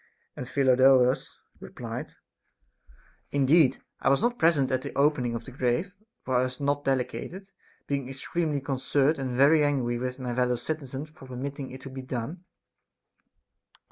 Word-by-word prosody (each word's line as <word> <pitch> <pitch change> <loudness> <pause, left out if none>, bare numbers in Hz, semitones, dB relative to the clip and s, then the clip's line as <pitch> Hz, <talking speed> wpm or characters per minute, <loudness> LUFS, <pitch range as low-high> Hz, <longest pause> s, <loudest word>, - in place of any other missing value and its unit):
And 125 - -6
Phidolaus 130 -1 +4 0.2
replied: - - -7 1.1
Indeed 140 +1 +3 0.2
I - - +2
was 135 - +4
not 240 +2 0
present 145 -5 +3
at 130 0 +1
the - - -7
opening 140 -5 +2
of 115 - -5
the 130 - -9
grave, 130 +9 -1 0.3
for 130 -1 +1
I - - +4
was 130 0 -5
not 145 0 0
delegated, 155 +9 -2 0.3
being 140 -2 -2
extremely 145 +2 -2
concerned 140 +2 +1
and 130 -2 -3
very 150 +3 +6
angry 125 -5 0
with 130 +1 -3
my 125 -2 -4
fellow 125 0 +1
citizens 145 +1 -5
for 135 -4 -14
permitting 135 +2 -5
it 130 0 -10
to 135 - -9
be 130 0 -6
done. 130 +8 -5
135 Hz, 150 wpm, -27 LUFS, 130-145 Hz, 1.1 s, very